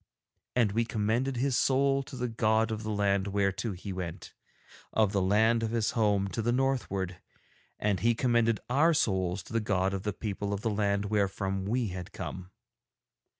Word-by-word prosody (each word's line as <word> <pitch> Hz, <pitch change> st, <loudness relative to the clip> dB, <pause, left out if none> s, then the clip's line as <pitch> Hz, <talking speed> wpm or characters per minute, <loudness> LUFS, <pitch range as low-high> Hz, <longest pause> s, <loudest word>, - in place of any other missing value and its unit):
And 115 Hz, -5 st, +3 dB
we 115 Hz, +3 st, +1 dB
commended 115 Hz, +4 st, -1 dB
his 130 Hz, +1 st, +1 dB
soul 135 Hz, +1 st, +3 dB
to 140 Hz, 0 st, -9 dB
the 125 Hz, -1 st, -2 dB
god 110 Hz, -1 st, +1 dB
of 110 Hz, -1 st, -3 dB
the 110 Hz, -, -5 dB
land 100 Hz, -2 st, +1 dB
whereto 100 Hz, +1 st, 0 dB
he 95 Hz, +2 st, -6 dB
went, 90 Hz, -3 st, -6 dB, 0.6 s
of 110 Hz, -3 st, +2 dB
the 100 Hz, -2 st, +1 dB
land 110 Hz, +5 st, +3 dB
of 115 Hz, -, -1 dB
his 115 Hz, -1 st, 0 dB
home 105 Hz, -3 st, +2 dB
to 115 Hz, -, -3 dB
the 120 Hz, +2 st, +1 dB
northward, 120 Hz, -9 st, -1 dB, 0.6 s
and 100 Hz, -3 st, 0 dB
he 115 Hz, +1 st, +2 dB
commended 115 Hz, -2 st, +2 dB
our 155 Hz, +6 st, +3 dB
souls 95 Hz, -5 st, 0 dB
to -, -, -12 dB
the 115 Hz, -, +2 dB
God 95 Hz, -3 st, 0 dB
of 95 Hz, -, -2 dB
the 105 Hz, -, -2 dB
people 100 Hz, 0 st, -4 dB
of 100 Hz, -, -3 dB
the 115 Hz, -, 0 dB
land 100 Hz, -1 st, 0 dB
wherefrom 95 Hz, -2 st, 0 dB
we 115 Hz, +1 st, 0 dB
had 90 Hz, -1 st, -7 dB
come. 95 Hz, 0 st, -6 dB
105 Hz, 185 wpm, -29 LUFS, 100-115 Hz, 0.6 s, And